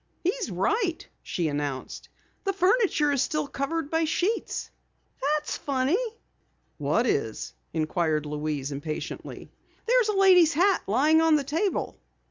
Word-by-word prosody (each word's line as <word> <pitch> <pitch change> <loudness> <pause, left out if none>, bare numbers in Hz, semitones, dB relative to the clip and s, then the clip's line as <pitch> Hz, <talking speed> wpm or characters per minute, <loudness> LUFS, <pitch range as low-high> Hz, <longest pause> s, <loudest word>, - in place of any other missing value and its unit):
"He's 390 +4 -1
right!" 345 - -1
she 170 -3 -2
announced. 145 -3 -4 0.3
"The 390 - 0
furniture 375 -6 +2
is 280 -3 +1
still 305 -1 0
covered 280 +3 -3
by 325 0 +2
sheets! 365 +8 -1 0.5
Why, 275 - -1
that's 300 - -4
funny." 280 - 0 0.8
"What 150 - +1
is?" 110 - -1 0.2
inquired 155 -1 0
Louise 150 -1 -3
impatiently. 150 +2 -6 0.3
"There's 485 -2 +3
a 415 - 0
lady's 360 -5 +6
hat 380 +3 +3
lying 300 +9 +4
on 325 -1 +5
the 295 - +1
table!" 325 +8 -2
295 Hz, 130 wpm, -26 LUFS, -, 0.8 s, lady's